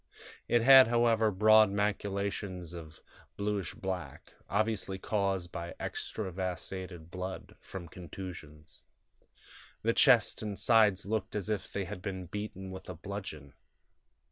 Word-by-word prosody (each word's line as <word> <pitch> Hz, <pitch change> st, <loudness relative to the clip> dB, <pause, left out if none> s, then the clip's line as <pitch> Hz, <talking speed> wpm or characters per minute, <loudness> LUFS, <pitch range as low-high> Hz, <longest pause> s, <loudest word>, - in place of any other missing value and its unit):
It 120 Hz, -1 st, +3 dB
had, 135 Hz, 0 st, +9 dB
however, 115 Hz, -2 st, +3 dB
broad 110 Hz, +2 st, +6 dB
maculations 100 Hz, -3 st, -2 dB
of 80 Hz, -2 st, -10 dB, 0.4 s
bluish 100 Hz, -3 st, -2 dB
black, 95 Hz, -1 st, -5 dB, 0.2 s
obviously 110 Hz, -3 st, 0 dB
caused 95 Hz, -3 st, -1 dB
by 85 Hz, 0 st, -6 dB
extravasated 90 Hz, -3 st, -5 dB
blood 95 Hz, +1 st, -6 dB
from 90 Hz, -3 st, -8 dB
contusions. 80 Hz, -4 st, -10 dB, 1.0 s
The 115 Hz, +1 st, +2 dB
chest 125 Hz, -4 st, +5 dB
and 105 Hz, -2 st, -4 dB
sides 105 Hz, -5 st, +4 dB
looked 105 Hz, 0 st, -2 dB
as 105 Hz, 0 st, -3 dB
if 100 Hz, -3 st, -3 dB
they 100 Hz, -1 st, -2 dB
had 95 Hz, 0 st, -7 dB
been 95 Hz, -1 st, -4 dB
beaten 95 Hz, 0 st, -6 dB
with 95 Hz, 0 st, -9 dB
a 90 Hz, -, -5 dB
bludgeon. 80 Hz, -7 st, -7 dB
95 Hz, 120 wpm, -31 LUFS, 90-105 Hz, 1.0 s, had